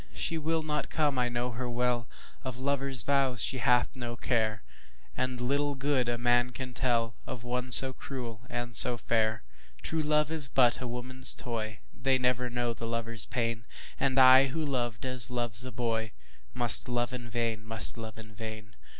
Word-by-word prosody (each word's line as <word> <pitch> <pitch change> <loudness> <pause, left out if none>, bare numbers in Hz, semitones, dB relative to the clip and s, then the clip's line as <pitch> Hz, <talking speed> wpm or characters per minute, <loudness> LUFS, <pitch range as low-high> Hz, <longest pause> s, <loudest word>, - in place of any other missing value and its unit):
She 165 - -1
will 160 +1 -1
not 150 -1 -3
come, 145 -4 0
I 125 -1 0
know 120 +1 -3
her 120 +1 -5
well, 120 -1 -1 0.3
Of 130 -2 -5
lover's 135 -2 0
vows 135 -3 +1
she 130 - -1
hath 125 0 +1
no 120 -2 -6
care, 110 -3 -1 0.5
And 130 0 -3
little 140 +3 -1
good 135 -2 0
a 120 - -1
man 120 +1 +2
can 125 0 -7
tellOf 115 -1 -3
one 125 +1 -4
so 130 +1 +8
cruel 120 -4 -8
and 120 -1 -5
so 120 - +8
fair. 110 -2 -1 0.4
True 160 0 -2
love 150 0 +1
is 155 -4 +1
but 125 -2 +2
a 125 - -4
woman's 130 +2 +6
toy, 110 -3 -5
They 135 -1 0
never 125 -1 0
know 120 -1 -2
the 115 0 -7
lover's 115 -2 -3
pain, 115 -2 -3 0.3
And 135 -1 +1
I 130 +1 +7
who 155 +4 -4
loved 120 -4 -3
as 130 -1 0
loves 120 -1 -2
a 130 - -7
boyMust 110 - -2
love 120 +1 -2
in 120 -1 -7
vain, 115 -2 -3
must 110 0 +2
love 110 -2 -9
in 110 -1 -12
vain. 110 0 -9
120 Hz, 175 wpm, -29 LUFS, 115-130 Hz, 0.5 s, so